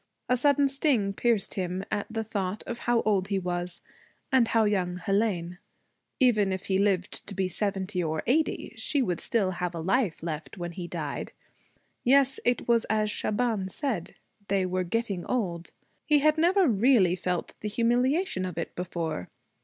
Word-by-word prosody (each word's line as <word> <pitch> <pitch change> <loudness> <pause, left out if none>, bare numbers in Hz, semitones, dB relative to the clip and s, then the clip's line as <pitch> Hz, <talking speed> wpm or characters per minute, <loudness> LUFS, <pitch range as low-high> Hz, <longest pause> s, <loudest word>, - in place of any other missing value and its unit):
A 250 - +3
sudden 285 +2 +3
sting 270 -8 +1
pierced 220 -2 +1
him 185 0 -3
at 205 -1 -1
the 225 0 -2
thought 205 -2 -3
of 235 - -5
how 240 -1 +2
old 195 -3 +1
he 200 -1 0
was, 175 -1 -3 0.5
and 260 -3 +4
how 225 -1 +3
young 185 -4 0
Hélène. 180 -2 -1 0.6
Even 215 -7 +4
if 190 0 -4
he 190 -1 +1
lived 195 -2 0
to 200 - -7
be 190 0 0
seventy 190 0 -2
or 160 -1 -2
eighty, 300 +2 0
she 275 +5 +1
would 175 -6 -1
still 205 -6 +1
have 180 -1 -3
a - - -4
life 190 0 0
left 155 -4 -5
when 175 -1 -4
he 175 0 -6
died. 155 -5 -5 0.7
Yes, 270 +1 +4
it 245 0 +1
was 235 -1 +3
as 215 -1 +1
Shaban 215 -2 -1
said. 225 - -3 0.3
They 195 -1 +1
were 185 0 -1
getting 195 -1 -2
old. 175 -9 -2 0.4
He 300 - +5
had 305 +1 +4
never 355 +3 +4
really 215 -5 +4
felt 180 -1 -3
the 210 - -3
humiliation 245 - +1
of 180 -3 -5
it - - -4
before. 165 - -4
200 Hz, 170 wpm, -28 LUFS, 180-240 Hz, 0.7 s, He